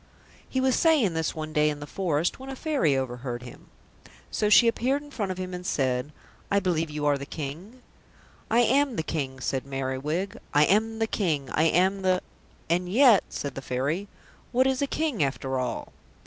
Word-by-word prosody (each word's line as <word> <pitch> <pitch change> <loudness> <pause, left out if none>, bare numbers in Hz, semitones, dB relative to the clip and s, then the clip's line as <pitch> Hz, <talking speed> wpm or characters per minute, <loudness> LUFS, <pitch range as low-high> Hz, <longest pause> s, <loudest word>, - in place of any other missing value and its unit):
He 260 - -1
was 260 -1 +3
saying 295 - +3
this 160 -1 -1
one 155 -1 -5
day 150 0 +3
in 150 -1 -4
the 145 - -6
forest 170 - -1
when 265 +1 -8
a 270 - -5
Fairy 260 - +1
overheard 125 -1 -4
him. 120 - -12 0.6
So 210 - +1
she 235 +3 +7
appeared 260 +5 +1
in 290 - -14
front 205 -8 -2
of 185 - -5
him 185 0 -5
and 180 0 -5
said, 130 -5 -1 0.4
"I 200 - +3
believe 170 -4 0
you 150 0 -3
are 145 -1 +2
the 140 - -6
King?" 170 - -7 0.7
"I 235 +2 +4
am 270 +2 +3
the 160 - -1
King," 135 -5 -3
said 135 0 -1
Merriwig. 140 +8 -3 0.2
"I 150 +1 +6
am 220 +5 +2
the 225 - +1
King, 155 -11 -1
I 155 - +2
am 190 +4 +3
the 185 -1 +1 0.2
" - - -31
"And 180 +2 0
yet," 230 -1 +6
said 140 -2 -4
the 135 - -6
Fairy, 140 +10 -2 0.4
"what 255 +1 +3
is 265 0 +1
a 280 - +1
King 300 - -1
after 135 -1 -1
all?" 125 -2 -4
175 Hz, 200 wpm, -26 LUFS, 140-225 Hz, 0.7 s, she